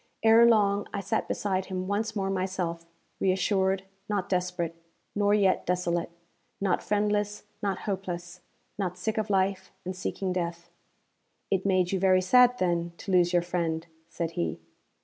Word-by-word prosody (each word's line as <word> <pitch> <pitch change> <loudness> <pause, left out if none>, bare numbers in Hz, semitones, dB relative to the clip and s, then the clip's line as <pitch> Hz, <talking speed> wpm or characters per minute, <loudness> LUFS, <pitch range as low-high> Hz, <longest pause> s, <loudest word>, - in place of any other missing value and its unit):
Ere 225 +1 +7
long 205 -3 +3
I 200 - -3
sat 195 0 -1
beside 190 -2 -1
him 185 -1 -4
once 215 +2 -1
more 195 -1 -1
myself 185 -3 -2 0.3
reassured, 190 0 +1 0.3
not 205 -3 -1
desperate, 180 -2 -1 0.4
nor 205 0 +3
yet 195 -3 +3
desolate; 175 -1 0 0.5
not 195 -2 +1
friendless, 210 0 0 0.2
not 195 -2 -1
hopeless, 180 -3 -4 0.4
not 185 -2 -2
sick 220 +4 -1
of 215 0 -2
life 190 -1 0
and 185 +1 -4
seeking 185 0 -2
death. 170 -1 -4 0.8
'It 195 0 +1
made 185 -2 +2
you 190 - 0
very 185 0 +5
sad, 250 +5 +6
then, 170 -3 0
to 195 - -6
lose 175 -1 +4
your 175 -1 +3
friend?' 170 -2 -2 0.2
said 165 -1 -3
he. 85 - -2
190 Hz, 150 wpm, -28 LUFS, 175-200 Hz, 0.8 s, Ere